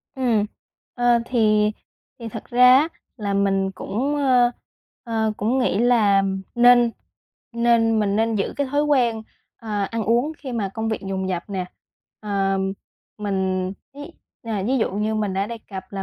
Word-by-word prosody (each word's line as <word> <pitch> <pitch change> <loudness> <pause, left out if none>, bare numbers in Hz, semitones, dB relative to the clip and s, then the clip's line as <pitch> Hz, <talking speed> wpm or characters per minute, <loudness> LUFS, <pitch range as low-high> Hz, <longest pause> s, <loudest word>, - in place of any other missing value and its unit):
Ừm. 240 -6 +1 0.5
Ờ, 245 -1 +3
thì 215 -3 +2 0.5
thì 230 -2 -6
thật - - -8
ra 250 +1 +6
á, 300 +4 +3 0.3
là 205 -4 -3
mình 195 -1 +1
cũng, 265 +10 -2
ơ, 255 -4 +3 0.5
ờ, 220 -2 -1
cũng 230 +6 0
nghĩ 245 -6 +1
là 220 -5 +4 0.3
nên 240 0 +6 0.6
nên 235 -1 +2
mình 200 -1 0
nên 225 +1 +1
giữ 195 - -1
cái 285 - 0
thói 290 +1 +2
quen, 245 -7 +1 0.3
à, 210 -3 -3
ăn 225 +2 -3
uống 240 +8 +1
khi 265 -3 -7
mà 215 -5 -1
công 220 0 -2
việc 220 - -2
dồn 190 -1 -3
dập 175 -2 -2
nè. 190 -2 -2 0.6
À, 195 -2 0 0.6
mình 190 -2 -1 0.2
ví, 290 +1 -9 0.3
à, 220 -4 -3
ví 260 +3 +1
dụ 220 - 0
như 210 +2 -1
mình 210 -3 -1
đã 195 +1 0
đề 230 +1 -6
cập 190 -2 -6
là 195 -1 -4
220 Hz, 170 wpm, -22 LUFS, 200-245 Hz, 0.6 s, ra